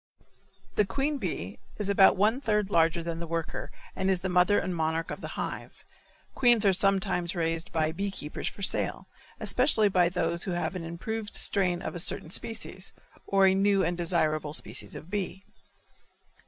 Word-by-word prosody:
The 210 - +4
queen 275 +8 -1
bee - - -4 0.2
is 210 - -3
about 195 -2 +5
one 220 +7 +2
third 210 -5 0
larger 165 -1 +3
than 165 0 -4
the 170 - -5
worker 165 -1 -4 0.2
and 190 - 0
is 185 -2 +1
the 190 - -2
mother 180 +3 +4
and 185 -1 -1
monarch 160 0 -1
of - - -6
the - - -7
hive. - - -6 0.5
Queens 240 -4 +4
are 195 - +5
sometimes 190 -2 +1
raised 165 -1 -2
by 155 -1 0
bee 200 +5 -3
keepers 150 -6 -5
for 200 - -6
sale, - - -1 0.3
especially 250 -5 +3
by 180 -3 +3
those 170 -1 -1
who 185 - -2
have 175 +2 -2
an 180 - -4
improved 205 +6 -5
strain 180 -3 +2
of - - -4
a 175 - -4
certain 160 -1 +1
species, 205 -3 -4 0.3
or 195 -1 +4
a 190 - +5
new 195 0 +3
and 175 - 0
desirable 155 -3 0
species - - -2
of 165 - -10
bee. 195 -1 -3
185 Hz, 180 wpm, -28 LUFS, 170-200 Hz, 0.5 s, about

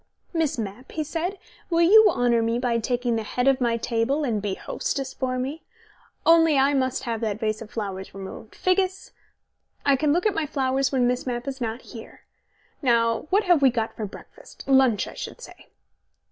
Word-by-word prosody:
"Miss 320 -5 0
Mapp," 220 +3 -6
he 315 - -1
said, 335 +6 -3 0.3
"will 335 -1 +2
you 430 +5 +8
honour 240 -1 +2
me 230 +1 0
by 240 -2 0
taking 240 0 -1
the - - -1
head 245 +4 -2
of 270 -1 +3
my 235 -1 +2
table 235 +6 0
and 225 -7 -1
be 200 -2 -2
hostess 270 +6 -4
for 255 -1 -2
me? 270 +5 -4 0.6
Only 325 -3 +5
I 275 +2 +4
must 260 -1 0
have 230 -2 -3
that 215 -2 -2
vase 215 0 -2
of 220 - -9
flowers 195 -4 -5
removed, 195 +3 -9
Figgis; 375 +1 0 0.7
I 280 -1 +5
can 295 +2 +1
look 350 +5 +1
at 425 - +3
my 320 -4 -1
flowers 270 -1 0
when 260 -3 +2
Miss 250 +1 -1
Mapp 245 +1 -3
is 270 -1 -5
not 230 +1 -3
here. 225 -2 -12 0.6
Now, 230 -2 +2
what 405 +3 +3
have 350 -5 +4
we 270 - +6
got 230 -2 -2
for 215 - -4
breakfast - - -14
lunch, 265 -6 +4
I - - -9
should - - -7
say?" - - -13
255 Hz, 195 wpm, -24 LUFS, 230-290 Hz, 0.7 s, you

